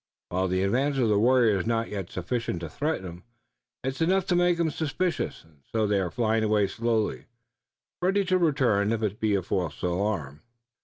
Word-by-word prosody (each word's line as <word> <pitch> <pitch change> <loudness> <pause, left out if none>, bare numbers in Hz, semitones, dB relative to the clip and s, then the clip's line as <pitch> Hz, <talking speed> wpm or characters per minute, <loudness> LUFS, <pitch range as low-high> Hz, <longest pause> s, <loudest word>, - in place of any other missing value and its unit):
While 95 +1 0
the 95 +1 0
advance 135 +8 +1
of 120 -4 +2
the 105 -1 +3
warriors 115 -4 +4
is - - -6
not 115 -1 0
yet 100 -3 -5
sufficient 90 0 -3
to 85 - -5
threaten 150 - -2
'em, 90 0 -9 0.6
it's 135 +3 -3
enough 185 +3 +2
to 180 - +3
make 175 -1 +3
'em 165 -2 +1
suspicious, 165 +4 -2
and 80 -3 -25
so 110 -1 +1
they 100 -1 +2
are 95 -2 -1
flying 110 +1 +1
away 105 -1 +3
slowly, 110 +2 -1 0.8
ready 195 +2 +2
to 185 0 +2
return 130 - +2
if 110 -1 -2
it 105 0 -2
be 110 -2 +2
a 95 - 0
false 90 -4 -2
alarm." 90 -6 -2
110 Hz, 195 wpm, -27 LUFS, 95-140 Hz, 0.8 s, warriors